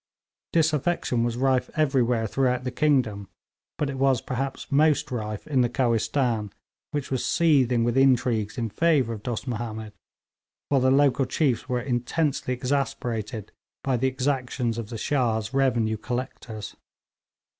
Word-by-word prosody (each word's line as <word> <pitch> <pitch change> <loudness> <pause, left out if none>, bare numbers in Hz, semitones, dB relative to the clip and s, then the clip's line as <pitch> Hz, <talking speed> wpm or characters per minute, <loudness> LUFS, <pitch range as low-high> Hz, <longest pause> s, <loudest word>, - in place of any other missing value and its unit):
Disaffection 155 -5 +1
was 120 0 -1
rife 130 -1 +1
everywhere 125 -6 +2
throughout 125 +2 0
the 125 - -3
kingdom, 125 -9 +1 0.5
but 150 - 0
it 135 -1 -4
was 135 -2 +3
perhaps 135 +1 -4
most 150 0 +3
rife 105 -3 -4
in 140 -4 +2
the 120 - +2
Kohistan, 115 -3 0 0.4
which 145 -3 -4
was 130 - 0
seething 130 -8 +3
with 120 0 0
intrigues 125 -5 +2
in 115 -3 -2
favour 145 -5 +2
of 105 - -7
Dost 120 +2 -4
Mahomed, 110 -2 -4 0.8
while 140 -2 +3
the 130 - +4
local 135 0 +4
chiefs 130 -1 0
were 125 -1 +1
intensely 130 +3 -1
exasperated 120 -5 -2 0.3
by 135 -2 +1
the 130 +2 +1
exactions 130 -3 -1
of 110 -2 -6
the 115 - -5
Shah's 115 -3 0
revenue 120 -5 +2
collectors. 120 -2 -5
125 Hz, 140 wpm, -25 LUFS, 115-135 Hz, 0.8 s, the